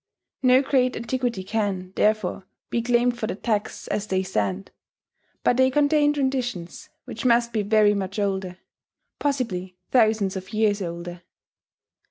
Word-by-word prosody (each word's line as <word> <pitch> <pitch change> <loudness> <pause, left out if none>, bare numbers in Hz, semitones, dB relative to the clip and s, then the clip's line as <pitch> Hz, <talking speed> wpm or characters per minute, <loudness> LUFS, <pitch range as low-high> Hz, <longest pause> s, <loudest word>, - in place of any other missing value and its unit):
No 255 +1 +5
great 255 -2 +2
antiquity 235 -3 -2
can, 190 -3 -2
therefore, 210 -3 0 0.2
be 235 - +1
claimed 240 0 +1
for 215 - -2
the - - -3
texts 210 0 -2
as 210 0 -2
they 190 -1 0
stand; 100 - -2 0.7
but 245 - +3
they 260 0 +5
contain 295 +2 +3
traditions 255 -10 -3 0.2
which - - -7
must 235 -1 +3
be 220 - +1
very 210 0 +4
much 195 -1 -3
older, 190 -3 -2 0.6
possibly 205 -11 -2
thousands 220 -5 +3
of 185 +1 -7
years 215 -1 +2
older. 170 0 -6
215 Hz, 140 wpm, -24 LUFS, 190-245 Hz, 0.7 s, No